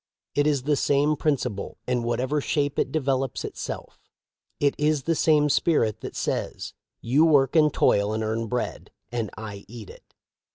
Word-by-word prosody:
It 145 +1 +2
is 145 -4 +1
the 145 +1 +2
same 145 +2 +2
principle, 125 -10 -2
in 125 -1 +1
whatever 125 +5 -1
shape 145 0 -1
it - - 0
developes 135 -4 -1
itself. - - -7 0.5
It 145 -1 +3
is 150 -2 +1
the 165 - +1
same 150 -2 +3
spirit 140 -8 +1
that - - -7
says: - - -3 0.3
'You 135 +7 +3
work 145 -3 +4
and 155 -2 +5
toil 100 -4 +2
and 110 0 -2
earn 110 +1 -2
bread, 125 +1 -3 0.2
and 115 -3 -2
I 105 -2 -7
eat 110 -3 -10
it.' - - -19
135 Hz, 165 wpm, -25 LUFS, 115-150 Hz, 0.5 s, and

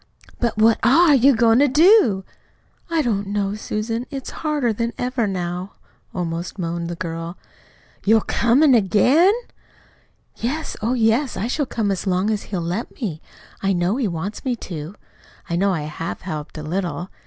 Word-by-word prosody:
"But 235 -3 -1
what 220 +1 +4
ARE 315 +5 +5
you 270 0 +5
goin' 230 +1 +4
to 290 - +5
do?" 300 - +5 0.7
"I 330 -2 +1
don't 205 -4 -1
know, 200 0 -1
Susan. 220 +3 -3
It's 270 -3 -6
harder 295 -7 0
than 230 +2 -2
ever 245 -2 -1
now," 180 0 -4 0.4
almost 170 +1 -4
moaned 170 -1 -3
the 175 - -4
girl. 165 0 -5 0.7
"You're 220 +2 +4
COMIN' 260 +8 +3
AGAIN?" 245 - +4 1.1
"Yes, 295 +7 -3
oh, 235 +4 0
yes. 230 +3 +1
I 205 - -2
shall 270 +3 -1
come 215 -5 -1
as 195 +1 -3
long 190 +3 +1
as 210 -1 -2
he'll 185 -4 -2
let 180 +8 -4
me. 175 - -4 0.4
I 195 0 +1
know 180 +5 0
he 260 -5 0
wants 175 +4 -5
me 255 -2 0 0.2
to. 160 +3 -6 0.5
I 170 - -2
know 195 +3 +2
I 170 -5 -1
HAVE 155 +3 -5
helped 155 -3 -6
a 155 - -6
little. 175 +2 -3
210 Hz, 165 wpm, -21 LUFS, 180-245 Hz, 1.1 s, ARE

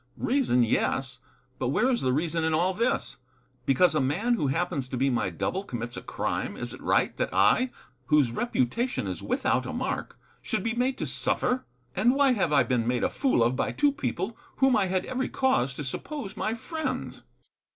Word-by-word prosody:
"Reason, 245 - +2
yes. 125 +2 0 0.4
But 130 - 0
where 215 - +2
is 240 - 0
the 130 - +1
reason 160 +4 0
in 160 -1 +2
all 180 +4 +2
this? 235 +6 -1 0.5
Because 155 +7 +4
a 155 - +2
man 180 - +1
who 150 -12 +1
happens 155 -2 -1
to 130 - -3
be 135 +2 +2
my 120 -6 0
double 185 - -2
commits 120 - -5
a - - -6
crime, - - -3
is - - -5
it - - -10
right - - +2
that - - -1
I, 105 - +4 0.4
whose 150 -6 +4
reputation 140 - -1
is 95 -3 -4
without - - 0
a - - -4
mark, - - -3 0.2
should - - -2
be 230 - 0
made 255 +2 0
to - - -2
suffer? 250 +1 0 0.3
And 240 +7 +3
why 280 -1 +4
have 195 -10 +1
I 145 -2 +5
been 120 -3 0
made 125 0 +1
a - - +1
fool 265 - +2
of 120 +2 +2
by - - -1
two 290 -1 +3
people 220 -5 -3 0.2
whom 265 -2 +4
I 200 -3 +2
had 185 0 0
every 260 0 -2
cause 135 - +1
to 150 - -5
suppose 210 - -5
my 220 - -1
friends?" 315 +6 -4
175 Hz, 200 wpm, -27 LUFS, -, 0.5 s, I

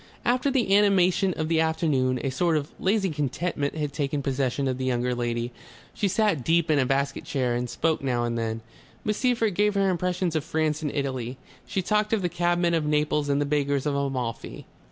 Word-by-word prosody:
After 255 +3 +2
the 245 -7 +2
animation 195 -2 +4
of 155 - -2
the 160 0 +2
afternoon 150 -6 +1
a 135 - -1
sort 165 +4 +1
of 145 0 -4
lazy 195 -1 +1
contentment 145 +1 -2
had 150 -3 -3
taken 140 -1 -2
possession 135 0 0
of 130 -1 -2
the 130 - -2
younger 125 -1 0
lady. 120 0 -2 0.4
She 205 - 0
sat 200 - +1
deep 165 +1 +2
in 150 - +3
a 130 - +2
basket 140 +1 0
chair 130 -4 -1
and 120 0 -2
spoke 160 +4 0
now 125 -3 0
and 120 0 -1
then. 115 -1 -2 0.4
Miss 210 0 0
Seyffert 235 -5 +1
gave 210 +2 +2
her 195 -1 +3
impressions 180 -1 -1
of 155 - 0
France 155 -1 -1
and 150 -2 -2
Italy. 130 -3 -3 0.3
She 190 - -1
talked 210 +2 +1
of 210 -4 +1
the 175 - +1
cabmen 175 0 +1
of 165 -2 +1
Naples 150 -1 +1
and 140 0 +2
the 145 - +1
beggars 140 -1 0
of 145 - 0
Amalfi. 130 -4 -3
150 Hz, 205 wpm, -26 LUFS, 135-180 Hz, 0.4 s, animation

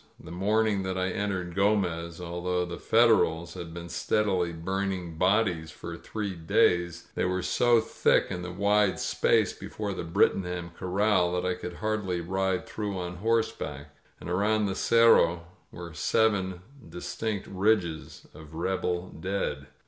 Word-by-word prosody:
•. - - -19
• - - -14
The 85 - -9
morn 105 +5 +1
ing 105 -3 0
that 95 0 -3
I 95 0 0
entered 95 -4 -2
Gomez, 90 -4 0
although 90 +1 -2
the 85 0 -7
Federals 110 -8 +3
had 85 -2 -7
been 85 0 -7
steadily 95 -2 0
burning 90 0 -3
bodies 90 -4 +2
for 85 +2 -8
three 105 +2 -5
days, 85 +1 +1
they - - -1
were 90 0 0
so 120 -1 +3
thick 110 - +1
in 90 - -3
the 90 - -5
wide 100 +1 +2
space 110 -5 +2
before 100 +1 -5
the 95 - -4
Brittingham 90 0 0
Cor 90 - -6
ral 95 -2 +2
that 90 0 -1
I 90 - +1
could 90 0 -6
hardly 105 -3 -2
ride 95 +1 -1
through 105 -3 -4
on 90 -1 -5
horseback, 100 -9 -2 0.2
and - - -9
around 105 +4 +1
the 95 - -1
Cerro 95 -7 +4 0.3
were 85 -1 -9
seven 95 +1 +1 0.3
distinct 100 +5 -4
ridges 95 -5 -1
of 80 0 -12
rebel 90 +1 -1
dead. 95 +4 -3
90 Hz, 155 wpm, -28 LUFS, 85-105 Hz, 0.3 s, Cerro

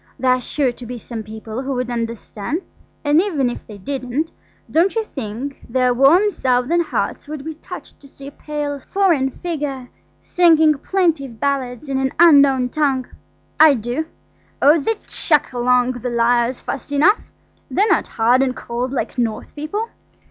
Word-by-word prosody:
There 260 -1 +2
are 255 0 +2
sure 270 0 0
to 240 0 -11
be 250 +1 -6
some 230 -1 -7
people 220 +2 -7
who 270 0 -3
would 250 0 -2
understand. 230 - -4 0.4
And 295 +3 +5
if 285 -11 -2
they 210 - -10
didn't, 270 - -3 0.4
don't 350 +6 +3
you 450 - +1
think 265 - -6
their 250 +1 +2
warm 325 - +5
Southern 255 +3 +1
hearts 330 - -3
would 300 -2 -7
be 320 - -4
touched 310 - -11
to 280 - -16
see 275 0 -13
a 280 - -7
pale, 295 -1 -4
slender, - - -24
foreign 340 -9 +2
figure 280 -5 -5 0.3
singing 320 -3 +4
plaintive 305 - 0
ballads 275 0 -2
in 270 -1 -1
an 265 0 -1
unknown 280 -6 +6
tongue? 270 -3 0 0.5
I 310 -2 +8
do. 245 +7 -3 0.5
Oh! 300 +4 +5
they'd 430 +9 -2
chuck 300 -5 +1
along 250 0 +2
the 245 0 -4
lyres 240 +1 +1
fast 275 +1 -6
enough–they're 385 +5 0
not 375 -7 +2
hard 240 +3 +2
and 260 -1 0
cold 245 +2 -4
like 255 -1 -3
North 225 -3 -2
people. 405 +10 -4
270 Hz, 165 wpm, -20 LUFS, 245-310 Hz, 0.5 s, I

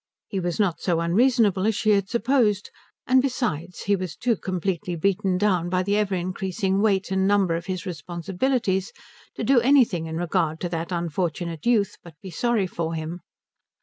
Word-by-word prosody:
He 195 - -3
was 175 0 -2
not 190 -6 +1
so 170 -3 +1
unreasonable 205 +2 +3
as 220 - +1
she 215 0 +2
had 200 -1 +2
supposed; 230 -3 +1 0.3
and 260 0 +4
besides, 200 - -2
he 200 - +2
was 185 -3 -5
too 240 -1 +1
completely 180 -2 -3
beaten 190 +2 +1
down 180 -4 +1
by 185 0 +1
the 200 +2 0
ever 205 -2 +1
increasing 190 +2 -1
weight 195 -3 +1
and 190 0 +2
number 195 -4 +3
of 170 +3 -5
his 185 -2 -4
responsibilities 190 - -2 0.4
to - - -4
do 270 -2 +5
anything 235 - +3
in 160 0 -4
regard 165 -2 0
to 175 - -2
that 165 +1 -4
unfortunate 170 0 -3
youth 215 -5 +2
but 170 -3 -14
be 190 - -9
sorry 230 +3 +1
for 165 -2 -3
him. 160 +2 -5
190 Hz, 180 wpm, -24 LUFS, 170-210 Hz, 0.4 s, do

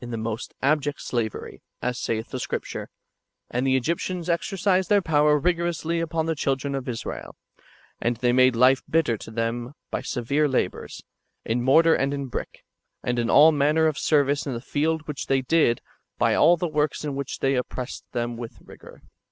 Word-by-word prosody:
477 120 -2 -5
the 115 - -1
most 110 - -6
abject 145 0 +1
slavery, 115 -3 -4 0.2
as 125 0 -2
saith 110 0 -2
the 130 - -4
Scripture: - - -4 0.3
" - - -32
And 125 +2 0
the 130 - +3
Egyptians 170 +5 -2
exercised 190 +2 0
tlieir 205 -2 +4
power 150 -2 +3
rigorously 170 +1 0
upon 165 -1 -1
the 165 - 0
children 140 -1 -1
of 135 -2 -4
Israel; 115 -2 -6 0.7
and 120 0 0
they 120 0 +2
made 130 -1 +5
life 130 +3 +5
bitter 160 -8 +2
to - - -10
them 115 +3 -3 0.2
by - - -2
severe 140 +5 0
labours, 130 - -2 0.4
in 115 +2 0
mortar 160 +6 +5
and 140 0 +1
in 140 -2 -5
brick, - - -6 0.4
and 120 0 -1
in 120 0 0
all 155 +3 +7
manner 150 +2 +2
of 155 -2 0
service 145 -1 +2
in 130 - -2
the - - -3
field 155 +4 -1
which 150 -3 -5
they 135 -1 +2
did, 140 -5 +2 0.4
by - - +3
all 175 +1 +5
the 175 - -1
works 150 -1 -1
in 145 - -2
which 140 -1 -4
they 135 0 +1
op 125 - -1
pressed 125 -1 -6
them 120 -1 -3
with 115 -1 -8
rigour." - - -15
140 Hz, 190 wpm, -25 LUFS, 125-160 Hz, 0.7 s, all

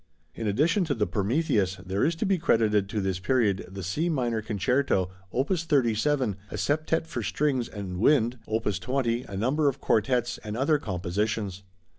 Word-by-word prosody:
In 110 - -4
addition 155 - +2
to 145 -4 -1
the 105 -3 +1
Prometheus, 105 - +1
there 95 +1 -2
is 165 +2 +2
to 165 - -2
be 190 -2 +2
credited 105 - +2
to 105 0 -1
this 95 -2 -1
period 100 -2 +1
the 95 0 -7
C 150 - -1
minor 120 -7 0
concerto, 105 -2 0 0.2
opus 155 +7 0
37, 130 - +1
a - - -6
septet 155 +2 0
for 125 -7 -4
strings 130 +1 0
and 95 -4 -6
wind, 120 0 +3
opus 110 -2 -1
20, 125 -2 -1
a 100 - -7
number 140 +8 +2
of 135 0 -5
quartets, 120 +1 +1
and 105 0 -6
other 145 +4 +2
compositions. 100 0 -2
115 Hz, 170 wpm, -27 LUFS, 100-140 Hz, 0.2 s, wind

